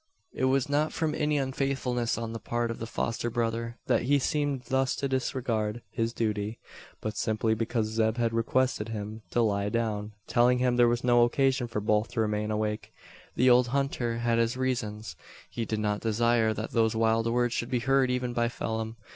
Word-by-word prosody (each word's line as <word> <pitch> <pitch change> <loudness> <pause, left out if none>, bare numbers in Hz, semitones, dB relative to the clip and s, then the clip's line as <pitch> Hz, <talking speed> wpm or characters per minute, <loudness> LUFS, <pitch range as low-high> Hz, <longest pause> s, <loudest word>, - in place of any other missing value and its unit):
It 130 - 0
was 130 0 +2
not 150 +2 +1
from 160 -2 -1
any 150 -1 +1
unfaithfulness 130 -3 -1
on 115 -1 -4
the 115 - -5
part 120 +2 -2
of 115 - -6
the 115 - -4
foster 115 +1 -2
brother, 115 0 -2
that - - +2
he 140 +4 +3
seemed 145 -1 -1
thus 130 +1 0
to 140 - -2
disregard 120 -4 -1
his 115 0 -1
duty; 105 -1 -2 0.4
but 110 0 -3
simply 110 +1 0
because 115 0 -1
Zeb 110 +1 0
had 115 -1 +1
requested 115 -1 0
him 110 0 -5
to 120 - +2
lie 100 -2 +1
down 105 -2 -2
telling 125 +1 +3
him 125 -1 +2
there 120 -1 +5
was 120 +1 0
no 120 -1 +5
occasion 130 +1 +2
for 110 -2 -3
both 105 +1 +2
to - - -2
remain 105 0 -1
awake. 105 0 -2 0.4
The 125 +1 +5
old 125 0 +5
hunter 130 -3 -1
had 115 0 +1
his 115 +2 +1
reasons. 110 -8 -2 0.4
He 115 - -3
did 110 - -2
not 105 -1 -1
desire 115 0 +2
that 110 +1 -4
those 110 -1 +2
wild 115 0 +2
words 120 0 +1
should 120 - -2
be 125 - +1
heard 135 0 +3
even 125 -1 -1
by 120 -1 +1
Phelim. 110 -1 -3
115 Hz, 195 wpm, -28 LUFS, 110-125 Hz, 0.4 s, there